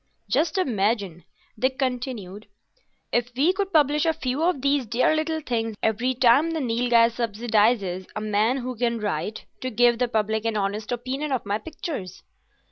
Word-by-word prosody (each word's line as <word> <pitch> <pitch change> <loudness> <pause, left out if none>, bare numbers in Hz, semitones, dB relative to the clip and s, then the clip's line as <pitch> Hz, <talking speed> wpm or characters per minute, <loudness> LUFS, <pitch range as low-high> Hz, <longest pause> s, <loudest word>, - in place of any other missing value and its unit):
"Just 325 +2 +1
imagine," 205 - 0 0.3
Dick 260 +2 +1
continued, 240 -7 -3 0.6
"if 240 0 +1
we 300 +8 +3
could 390 0 -2
publish 300 -2 +3
a 325 - +2
few 275 -2 -3
of 330 -6 +1
these 280 -3 +1
dear 245 +7 +2
little 315 0 -1
things 225 -5 -2
every 230 +4 +1
time 255 +6 +4
the 325 -1 -2
Nilghai 235 -2 +3
subsidises 215 -4 0
a - - -2
man 215 +4 +1
who 255 -1 -4
can 235 0 0
write, 205 0 -3
to 255 - -3
give 240 0 +3
the 250 - +2
public 220 -1 0
an 225 -1 0
honest 205 +2 -2
opinion 260 +5 -3
of 260 -3 -1
my 205 +1 -1
pictures." 290 - -7
240 Hz, 165 wpm, -24 LUFS, 215-270 Hz, 0.6 s, time